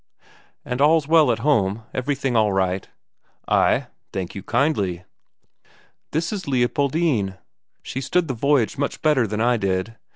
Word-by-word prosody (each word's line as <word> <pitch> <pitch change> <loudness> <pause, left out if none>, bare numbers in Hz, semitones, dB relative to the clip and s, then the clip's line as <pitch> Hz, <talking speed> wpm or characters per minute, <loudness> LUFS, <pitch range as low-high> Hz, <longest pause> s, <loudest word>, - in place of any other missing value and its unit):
"And 125 +2 -3
all's 155 0 +4
well 155 -5 +5
at 115 - 0
home, 110 -7 +2
everything 135 -1 -1
all 110 -2 +3
right?" 95 -1 -1 0.6
"Ay, - - +2 0.3
thank 95 -2 -4
you 100 - -6
kindly." 95 - 0 1.1
"This 165 +5 -2
is 190 -4 -5
Leopoldine; 130 - 0 0.5
she's 135 +1 -5
stood 180 -2 +1
the 135 - -2
voyage 135 0 +1
much 140 - -3
better 145 -7 +3
than 105 +1 -3
I 120 +1 +3
did. 100 +2 -2
125 Hz, 140 wpm, -22 LUFS, 100-145 Hz, 1.1 s, well